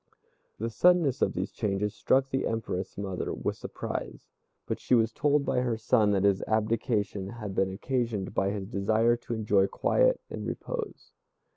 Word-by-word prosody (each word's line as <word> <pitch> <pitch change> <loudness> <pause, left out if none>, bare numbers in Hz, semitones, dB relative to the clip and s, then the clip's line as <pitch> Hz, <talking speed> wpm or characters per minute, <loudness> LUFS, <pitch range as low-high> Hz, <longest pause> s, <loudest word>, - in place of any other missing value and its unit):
The 115 +2 -3
suddenness 165 -1 +3
of - - +2
these - - -3
changes 105 -1 -1
struck 135 0 +2
the 135 - 0
Empress 100 -4 -3
mother 95 -2 -3
with - - -2
surprise, - - -6 0.4
but - - -3
she 125 - +2
was 115 -1 +3
told 145 +3 +2
by 125 - +1
her 120 -3 0
son 110 -1 +3
that 95 -1 +1
his 100 -1 +3
abdication 110 -2 0
had 105 -3 -6
been 95 0 +1
occasioned 115 -2 -2
by 95 - +1
his 100 -1 -3
desire 110 +4 +2
to 120 0 -6
enjoy 105 -3 +3
quiet - - +2
and - - -6
repose. 470 -3 -5
110 Hz, 165 wpm, -28 LUFS, 100-125 Hz, 0.4 s, suddenness